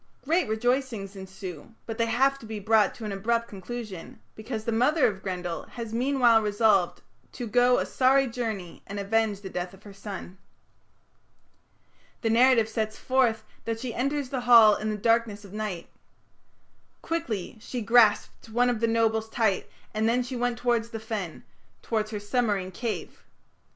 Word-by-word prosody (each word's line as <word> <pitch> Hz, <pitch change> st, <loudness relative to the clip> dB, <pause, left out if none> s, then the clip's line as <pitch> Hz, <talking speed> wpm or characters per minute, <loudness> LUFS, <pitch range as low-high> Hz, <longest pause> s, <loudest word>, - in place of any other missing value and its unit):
Great 335 Hz, +2 st, +2 dB
rejoicings 225 Hz, -2 st, -1 dB
ensue, 190 Hz, 0 st, -9 dB
but 225 Hz, 0 st, -6 dB
they 230 Hz, -, +2 dB
have 270 Hz, +4 st, +2 dB
to 225 Hz, -, -11 dB
be 215 Hz, -1 st, -5 dB
brought 215 Hz, 0 st, +3 dB
to 225 Hz, -, -8 dB
an 210 Hz, -, -3 dB
abrupt 230 Hz, +4 st, 0 dB
conclusion, 205 Hz, -2 st, -8 dB
because 220 Hz, 0 st, -5 dB
the 230 Hz, -, 0 dB
mother 260 Hz, +7 st, +3 dB
of 190 Hz, -2 st, 0 dB
Grendel 180 Hz, -3 st, -4 dB
has 230 Hz, -2 st, -7 dB
meanwhile 245 Hz, -2 st, +4 dB
resolved 205 Hz, -3 st, +2 dB, 0.3 s
"to 245 Hz, -, -5 dB
go 245 Hz, +3 st, +4 dB
a -, -, 0 dB
sorry 270 Hz, +1 st, +3 dB
journey 225 Hz, -8 st, -4 dB
and 200 Hz, +1 st, -5 dB
avenge 210 Hz, 0 st, 0 dB
the 195 Hz, -, -7 dB
death 180 Hz, +1 st, -4 dB
of 195 Hz, -, -21 dB
her 205 Hz, -, -11 dB
son". 195 Hz, -2 st, -8 dB, 1.8 s
The 225 Hz, -, +1 dB
narrative 235 Hz, -1 st, +5 dB
sets 220 Hz, -1 st, -3 dB
forth 255 Hz, -4 st, +1 dB, 0.2 s
that 225 Hz, -1 st, -2 dB
she 240 Hz, -1 st, -4 dB
enters 275 Hz, +2 st, -1 dB
the 260 Hz, -2 st, -2 dB
Hall 230 Hz, -3 st, +7 dB
in 215 Hz, -, -3 dB
the 215 Hz, -, -2 dB
darkness 225 Hz, -1 st, +1 dB
of 195 Hz, -, -13 dB
night. 210 Hz, -5 st, -4 dB, 1.2 s
"Quickly 235 Hz, -, -3 dB
she 250 Hz, +2 st, -5 dB
grasped 225 Hz, -1 st, +3 dB
one 245 Hz, +2 st, +2 dB
of 235 Hz, -, -2 dB
the 230 Hz, -, +2 dB
nobles 225 Hz, -1 st, +1 dB
tight, 220 Hz, -5 st, 0 dB, 0.2 s
and 220 Hz, +1 st, +1 dB
then 245 Hz, +2 st, +2 dB
she 250 Hz, +1 st, -6 dB
went 245 Hz, 0 st, -1 dB
towards 235 Hz, -1 st, 0 dB
the 225 Hz, -, -6 dB
fen", 215 Hz, -7 st, -5 dB, 0.4 s
towards 215 Hz, -2 st, -1 dB
her 215 Hz, -2 st, -4 dB
submarine 205 Hz, -3 st, -1 dB
cave. 225 Hz, +4 st, -5 dB
225 Hz, 165 wpm, -27 LUFS, 205-245 Hz, 1.8 s, Hall